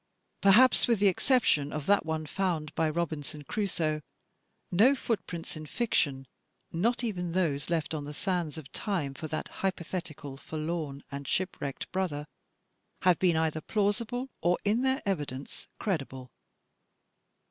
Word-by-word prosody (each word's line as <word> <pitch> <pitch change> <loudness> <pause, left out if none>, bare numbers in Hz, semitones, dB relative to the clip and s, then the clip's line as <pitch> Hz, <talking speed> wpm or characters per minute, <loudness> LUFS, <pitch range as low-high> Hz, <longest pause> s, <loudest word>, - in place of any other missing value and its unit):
Perhaps 225 +6 +7
with 235 -2 +4
the 205 - +5
exception 180 - +3
of 150 -2 -3
that 205 +3 +4
one 160 -1 -1
foimd 165 -3 -1
by 160 -1 +2
Robinson 155 -2 -3
Crusoe, 160 -5 -1 0.7
no 225 +10 +6
footprints 190 -10 -3
in 155 0 -7
fiction, 140 - +1 0.3
— 130 - -38
^not 235 +9 +1
even 180 -7 -2
those 155 -6 0
left 160 -2 0
on 150 -2 -3
the 145 - -6
sands 175 -4 -1
of 145 -3 -9
time 175 -10 -1
for 155 +3 -6
that 155 - -3
hypothetical 170 -6 -3
forlorn 155 -1 -4
and 140 0 -5
shipwrecked 160 -7 -2
brother, 175 -6 -1 0.4
— - - -45
have 180 -3 +5
been 175 -3 +3
either 160 -1 +1
plausible 225 - 0
or, 175 +1 +3
in 215 +4 +3
their 265 0 +1
evidence, 145 -8 -3
credible. 135 - -3
170 Hz, 145 wpm, -30 LUFS, 150-195 Hz, 0.7 s, Perhaps